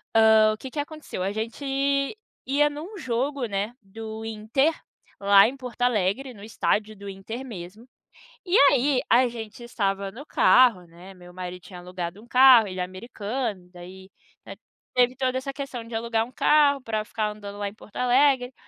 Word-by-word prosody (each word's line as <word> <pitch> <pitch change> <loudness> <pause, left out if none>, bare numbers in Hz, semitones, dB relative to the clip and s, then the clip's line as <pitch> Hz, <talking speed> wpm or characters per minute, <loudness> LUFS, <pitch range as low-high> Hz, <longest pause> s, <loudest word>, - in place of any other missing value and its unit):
hã, 220 -1 +6
o - - -7
que 265 - -8
que 290 - -6
aconteceu, 305 - -7
a 195 - -1
gente 220 +6 -5 0.8
ia 285 +2 +3
em 295 0 -6
um 370 +8 -9
jogo, 260 -1 -2
né, 205 +2 -3
do 220 +2 -8
Inter, 225 +7 0 0.5
lá 200 0 +7
em 265 +4 -6
Porto 250 -2 -9
Alegre, 245 +2 +1
no 200 -3 -13
estádio 215 0 -1
do 200 0 -9
Inter 205 +6 -7
mesmo, 205 -1 -9 0.6
e 365 +1 +1 0.2
aí 270 0 +2
a 250 +2 +5
gente 225 -1 -9
estava 200 -4 -2
no 245 +8 -11
carro, 240 - +4
né, 175 +3 -14
meu 180 -1 -15
marido 180 0 -7
tinha 180 +2 -11
alugado 180 +1 -6
um - - -16
carro, 250 -2 +7
ele 185 -1 -6
é - - +1
americano, 205 +1 -5
daí 185 +2 -12 0.8
teve 250 0 +3
toda 260 0 0
essa 275 +1 -5
questão 270 -4 -6
de 230 0 -10
alugar 225 0 0
um 250 - -16
carro 285 0 +3
para 215 -3 -2
ficar 215 -1 -2
andando 205 -1 -9
lá 205 0 -2
em 200 - -11
Porto 215 -1 -17
Alegre. 255 0 +3
225 Hz, 180 wpm, -25 LUFS, 200-255 Hz, 0.8 s, lá